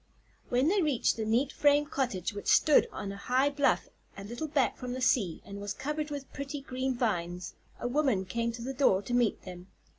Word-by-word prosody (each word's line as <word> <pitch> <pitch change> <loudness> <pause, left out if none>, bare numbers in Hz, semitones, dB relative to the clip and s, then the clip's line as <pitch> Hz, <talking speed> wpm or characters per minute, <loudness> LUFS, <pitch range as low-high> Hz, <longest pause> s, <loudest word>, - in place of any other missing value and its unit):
When 250 +3 +2
they 390 +3 +3
reached 295 -7 +2
the 220 - -3
neat 245 +6 +1
frame 290 0 +3
cottage 245 - -2
which 205 - -7
stood 300 - +5
on 200 - -5
a 200 - -7
high 260 +7 +1
bluff 280 -2 +1 0.3
a 195 - -7
little 240 +9 -5
back 285 -3 +1
from 250 -1 -5
the 255 - -4
sea 215 -9 +1
and 200 0 -8
was 205 0 -4
covered 300 +1 -3
with 285 -2 -7
pretty 280 +1 -5
green 260 -1 -3
vines, 180 -6 -2 0.3
a - - -2
woman 250 -7 +1
came 230 +5 -1
to 230 0 -7
the 265 +2 -4
door 225 -8 +3
to 245 - -5
meet 245 -2 +1
them. 180 -1 -10
250 Hz, 210 wpm, -30 LUFS, 205-280 Hz, 0.3 s, stood